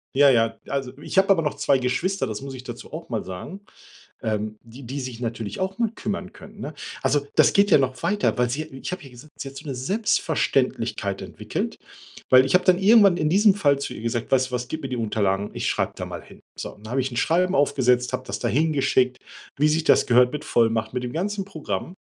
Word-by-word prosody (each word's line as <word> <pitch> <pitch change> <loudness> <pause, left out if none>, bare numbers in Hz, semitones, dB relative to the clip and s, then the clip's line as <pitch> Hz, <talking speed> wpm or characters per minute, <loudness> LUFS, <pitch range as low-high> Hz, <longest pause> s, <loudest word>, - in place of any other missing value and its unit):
Ja, 140 0 +6
ja. 115 -3 +3
Also, 135 -2 -3
ich 150 - -7
hab 195 +1 +4
aber 180 -4 +5
noch 150 -2 -1
2 135 - +2
Geschwister, 135 +7 -1
das 110 +2 -5
muss 135 -1 -6
ich 130 0 -9
dazu 120 +3 -9
auch 165 +2 -7
mal 115 -3 -3
sagen, 95 - -8 0.6
ähm, 110 0 -2
die 115 +4 -13
die 135 +4 -5
sich 125 -2 -6
natürlich 115 - -4
auch 190 +1 -2
mal 230 -3 +1
kümmern 200 -2 -4
können, 205 +2 -14
ne? 150 - -5 0.3
Also, 145 -1 +1
das - - +6
geht 200 +1 +4
ja - - +8
noch 130 -2 0
weiter, 205 -10 +1
weil 125 -1 +2
sie 150 +5 -2
ich 135 0 -8
hab 180 -2 -5
ja 135 - -12
gesagt, 125 +5 -15
sie 135 - -5
hat 135 - -13
so 150 - -11
'ne 135 - -3
Selbstverständlichkeit 205 - 0
entwickelt, - - -4 0.5
weil 130 +1 +7
ich 135 - -2
hab 180 0 +5
dann 180 -1 +5
irgendwann 200 -2 +6
in 155 - +1
diesem 200 +4 +5
Fall 145 -8 +2
zu 140 -2 -4
ihr 110 - -8
gesagt: 115 +2 -3
„Weißt 130 0 +3
du - - -16
was, 125 0 -3
gib 155 +1 -4
mir 135 - -4
die 125 - -3
Unterlagen, 105 -3 0
ich - - -2
schreib - - -1
da - - -5
mal - - -7
hin.“ - - -16 0.2
So. - - -5
Und 105 +1 -15
dann 110 - -7
hab 135 - 0
ich 130 0 0
'n - - -6
Schreiben 180 +6 +2
aufgesetzt, 125 -4 +2
hab - - -3
das 105 +1 -4
dahin 155 +4 +1
geschickt, 130 -2 +2 0.4
wie 150 +1 +4
sich 155 +1 +1
das - - +4
gehört, 125 +1 +5
mit 150 - -5
Vollmacht, 115 0 +1
mit 125 - -2
dem 120 - -4
ganzen 195 +4 -2
Programm. 180 0 -5
135 Hz, 240 wpm, -24 LUFS, 120-175 Hz, 0.6 s, ja